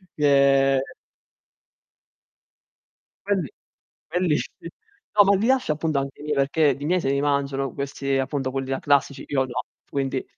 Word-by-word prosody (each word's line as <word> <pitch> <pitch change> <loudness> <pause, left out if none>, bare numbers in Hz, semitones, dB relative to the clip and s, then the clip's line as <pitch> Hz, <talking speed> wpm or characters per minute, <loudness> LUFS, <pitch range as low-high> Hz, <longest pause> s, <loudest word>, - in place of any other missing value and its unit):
che 140 -2 +4 2.5
Quelli 195 -8 0 0.6
quelli 170 -2 +1
sì. 170 - -7 0.5
No, 205 - +8
ma 200 0 +4
li 220 - 0
lascio 260 -10 +2
appunto 155 -2 -1
anche 135 0 -6
i - - -9
miei, 150 -1 -1
perché 140 +1 +2
i 145 - -6
miei 180 +3 +2
se 135 - -1
li 140 0 +1
mangiano 140 -2 -1
questi 140 -1 -2
appunto 135 0 -2
quelli 135 0 -4
là 135 - -1
classici 140 -1 +1
io 135 -2 +1
no, 125 0 -4 0.3
quindi 135 -1 -2
140 Hz, 150 wpm, -24 LUFS, 135-155 Hz, 2.5 s, No